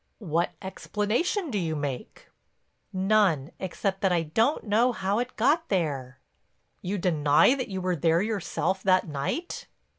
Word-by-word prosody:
"What 170 -4 -1
explanation 225 - -1
do 210 - 0
you 160 -3 -2
make?" 145 -4 -5 0.6
"None—except 190 -1 0
that 195 - +2
I 170 -2 +2
don't 225 - +1
know 225 +4 +3
how 200 +1 -1
it 245 +1 -4
got 310 +8 +2
there." 140 -9 -2 0.6
"You 195 +3 -2
deny 155 - +4
that 265 -2 -3
you 190 -2 -4
were 180 0 0
there 165 +3 +2
yourself 195 -2 -2
that 185 -1 +3
night?" 150 - -4
190 Hz, 140 wpm, -27 LUFS, 165-215 Hz, 0.6 s, deny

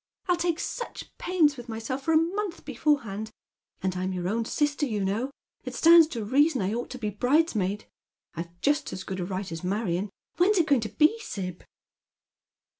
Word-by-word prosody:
I'll 360 - +4
take 340 -1 0
such 480 - -6
pains 320 -6 +2
with 245 -1 -9
myself 225 +4 -4
for 325 - 0
a 320 - +6
month 360 +3 -1
before 295 -2 +1
hand, 215 0 -5 0.5
and 185 -1 0
I'm 185 +1 -2
your 180 -1 -2
own 225 +4 0
sister, 295 +3 0
you 210 -5 -1
know. 220 +7 -1 0.3
It - - -6
stands 335 -1 +8
to 235 -9 -4
reason 280 +5 +3
I 195 +3 0
ought 240 +1 -3
to 255 - -6
be 215 -4 -3
bridesmaid; 215 - +1 0.5
I've 170 +1 -7
just 290 0 +1
as 185 - -5
good 190 0 -5
a 180 - -2
right 185 0 -4
aa 165 +1 -6
Marion. 195 0 -1 0.3
^Vhen 360 +3 +5
is 420 - +3
it 340 - +4
going 280 -6 +3
to 215 - -3
be, 310 - +3
Sib 185 - -6
240 Hz, 195 wpm, -27 LUFS, 195-315 Hz, 0.5 s, stands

